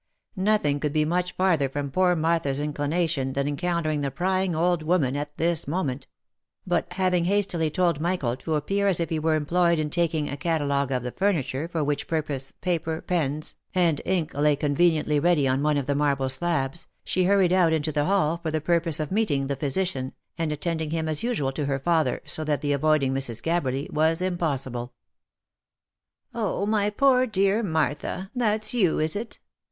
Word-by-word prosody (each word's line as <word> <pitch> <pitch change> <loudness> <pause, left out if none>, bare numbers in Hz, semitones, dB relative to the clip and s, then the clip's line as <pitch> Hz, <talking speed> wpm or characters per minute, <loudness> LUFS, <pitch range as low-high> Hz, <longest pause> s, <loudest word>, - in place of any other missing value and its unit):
Nothing 185 -8 +1
could 150 -1 -2
be 155 -1 +2
much 180 +2 -1
farther 170 -7 +2
from 140 0 -4
poor 180 +3 +3
Martha's 160 -4 0
inclination 145 -1 -1
than 140 +1 -1
encountering 155 0 -1
the 140 - -1
prying 185 +4 0
old 175 +1 +1
woman 155 -5 +1
at 145 +1 -5
this 165 -3 0
moment; 145 -5 -2 0.6
but 175 -1 -1
having 180 -2 +1
hastily 185 -4 +1
told 170 -2 +1
Michael 165 -9 0
to 155 +3 -2
appear 195 +7 0
as 190 -4 +2
if 170 - -1
he 160 - 0
were 160 0 +1
employed 170 +3 +2
in 155 -1 -2
taking 165 -3 +1
a 140 - -4
catalogue 140 -4 0
of 125 -2 -1
the 125 - -4
furniture, 165 -6 -1
for 165 -3 -2
which 145 0 -2
purpose, 145 -4 -2
paper, 165 -3 -1
pens, 155 -4 -1 0.2
and 170 -5 +2
ink 175 -4 -1
lay 145 0 +2
conveniently 150 +1 +2
ready 160 -3 +3
on 130 +1 +1
one 150 0 +2
of 140 - -1
the 140 - 0
marble 140 -2 +1
slabs, 145 0 -1 0.2
she 185 -1 0
hurried 190 -2 +3
out 180 -3 +4
into 155 -1 0
the 145 0 0
hall 170 -4 +1
for 165 - -2
the 155 0 -1
purpose 165 0 +1
of 155 +1 -3
meeting 170 -10 +1
the 140 0 -2
physician, 140 -2 -2 0.2
and 165 -2 -2
attending 160 +1 -2
him 160 0 -2
as 155 -1 -1
usual 220 - -1
to 145 +2 -3
her 135 -1 0
father 160 +2 +1
— - - -35
so 155 - -2
that 150 -2 -1
the 145 -1 0
avoiding 140 -2 +2
Mrs. 135 -4 -1
Gabberly 145 -5 -1
was 160 +2 +2
impossible. 140 -9 -2 1.4
"Oh, 210 -3 -1
my 210 -1 +1
poor 255 +3 +3
dear 200 0 +2
Martha! 160 +1 -2
that's 220 -2 +2
you, 190 -9 +2
is 155 +3 +1
it? 225 +3 -5
160 Hz, 185 wpm, -25 LUFS, 145-180 Hz, 1.4 s, out